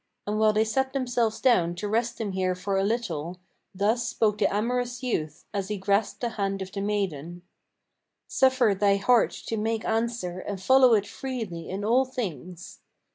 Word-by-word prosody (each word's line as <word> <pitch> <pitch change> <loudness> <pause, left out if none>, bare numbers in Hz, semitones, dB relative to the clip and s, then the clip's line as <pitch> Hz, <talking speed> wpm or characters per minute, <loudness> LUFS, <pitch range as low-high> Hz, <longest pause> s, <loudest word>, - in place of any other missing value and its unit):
And 210 +1 -1
while 215 0 +5
they 215 +1 +2
sat 265 +4 -1
themselves 245 -4 0
down 175 -10 +3
to 190 +4 -4
rest 230 +3 0
them 215 -3 -3
here 185 -1 0
for 195 +2 -3
a 195 - +2
little, 180 -7 -2 0.4
Thus 220 +5 +1
spoke 210 -2 +1
the 200 - +2
amorous 245 +4 -1
youth, 155 - -3
as 200 -2 -2
he 210 0 -3
grasped 200 +2 0
the 240 - 0
hand 195 -3 -2
of 190 - -10
the 195 - -4
maiden: 175 -5 -3 0.8
"Suffer 260 -5 +3
thy 200 +1 +3
heart 230 +4 +3 0.2
to 225 - -2
make 220 +1 -1
answer, 225 -5 -1
and 200 0 -5
follow 255 +3 +6
it 205 -1 +1
freely 210 -9 -6
in 195 +2 -4
all 250 +4 +3
things." 180 - -6
210 Hz, 180 wpm, -26 LUFS, 190-235 Hz, 0.8 s, follow